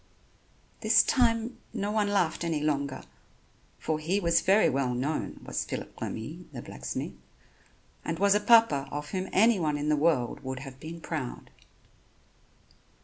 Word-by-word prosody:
This - - +5
time 230 -2 +1
no 205 -2 -2
one 210 -1 +1
laughed 190 -5 +1
any 165 -3 0
longer, 140 -2 -1 0.7
for 155 -1 -2
he 175 +6 0
was 170 -3 +3
very 195 +3 +4
well 130 -2 0
known, 145 +5 -2
was - - -2
Phillip - - -7
Remy, 155 +11 -6
the 120 -4 -7
blacksmith, - - -5 0.9
and 165 - -3
was 200 +2 +4
a 210 - +3
papa 210 -11 +5
of 150 0 -5
whom 190 -1 -3
anyone 185 -8 +3
in 145 +1 -2
the 150 - +4
world 145 -5 +1
would 130 0 -5
have 135 -1 -10
been 165 +3 -8
proud. 150 -8 -5
160 Hz, 145 wpm, -28 LUFS, 140-200 Hz, 0.9 s, This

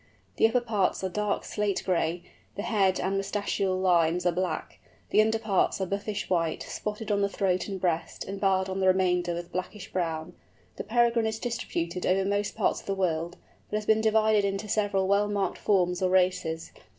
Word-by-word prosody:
The - - +6
upper 245 +2 +1
parts 210 -6 0
are 190 - 0
dark 210 +2 -1
slate 210 -2 -1
gray, 170 -1 0 0.3
the 205 - -4
head 200 -5 +2
and 195 +1 -1
moustachial 195 -1 -1
lines 175 -2 +2
are 175 - +4
black, 180 +1 -3 0.3
the - - +6
underparts 220 -3 +1
are 190 - 0
buffish 200 +2 -3
white, 165 -3 0
spotted 210 0 -4
on 200 -1 +2
the 200 - +2
throat 190 -2 0
and 195 -2 -4
breast, 170 -3 -2
and 195 +1 -6
barred 190 -1 +2
on 190 0 -3
the 190 - +2
remainder 180 -2 +2
with 175 0 -6
blackish 185 +2 -5
brown. 165 -1 -2 0.4
The - - -4
Peregrine 235 0 +2
is 220 0 -2
distributed 180 -7 -3
over 190 +1 +2
most 205 0 -1
parts - - +1
of - - -16
the 195 - 0
world, 170 -2 -1 0.3
but 210 - -1
has 215 - -4
been 220 0 +3
divided 220 -1 +3
into 200 +1 -2
several 200 -2 +1
well 200 +1 +3
marked 200 -3 -1
forms 180 -3 +1
or 185 - +2
races. 180 -3 +1
195 Hz, 190 wpm, -28 LUFS, 180-210 Hz, 0.4 s, The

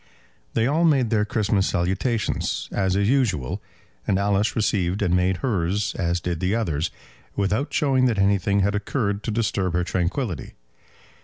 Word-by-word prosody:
They 115 - +2
all 155 +6 +2
made 135 -8 +3
their 105 -2 +2
Christmas 105 -2 +1
salutations 100 +6 -1
as 95 -2 0
is 100 0 +2
usual, 105 - 0 0.5
and 95 - +2
Alice 100 +2 +1
received 100 -3 0
and 90 -2 +2
made 90 0 +2
hers 100 -3 0
as 85 -1 -1
did 85 -1 -3
the 95 +5 0
others, 85 -8 -1 0.5
without 105 - 0
showing 135 -3 +2
that 115 -4 0
anything 100 0 +2
had 100 +2 +1
occurred 105 0 -1
to 115 - -5
disturb 105 -5 0
her 90 0 +1
tranquillity. 90 - -2
100 Hz, 155 wpm, -24 LUFS, 90-110 Hz, 0.5 s, made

